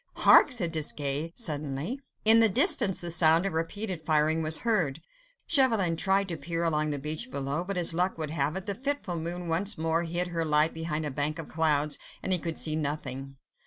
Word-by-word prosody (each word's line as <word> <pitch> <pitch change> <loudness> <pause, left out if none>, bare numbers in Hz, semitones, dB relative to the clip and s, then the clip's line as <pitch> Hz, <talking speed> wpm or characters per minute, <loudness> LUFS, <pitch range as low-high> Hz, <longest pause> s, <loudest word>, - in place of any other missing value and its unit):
"Hark!" - - +6
said 185 -10 +2
Desgas 150 -1 -2
suddenly. 150 - -3 0.3
In 225 +1 +8
the 225 -1 +5
distance 230 - +4
the 175 -1 -3
sound 165 +1 +4
of 195 - -2
repeated 180 +2 -4
firing 155 +1 +1
was 155 0 +4
heard. 180 - 0 0.5
Chauvelin 225 - +2
tried 195 +3 +1
to 165 - -4
peer 165 +3 -4
along 155 -2 0
the 145 - -2
beach 155 - -4
below, 140 - -3
but 195 +1 -5
as 170 -2 +2
luck 180 +2 -1
would 155 -2 -5
have 150 0 -2
it, 190 0 -5
the 200 - -3
fitful 265 -5 -4
moon 170 +2 -4
once 190 +6 0
more 160 +1 0
hid 175 +1 -2
her 165 -1 -2
light 150 0 +1
behind 160 -1 -4
a 145 - -4
bank 145 +4 -2
of 165 - -8
clouds, 150 -2 0 0.2
and 190 - +1
he 180 - +3
could 165 -1 -5
see 155 -1 +1
nothing. 135 -3 -5
165 Hz, 200 wpm, -27 LUFS, 150-185 Hz, 0.5 s, In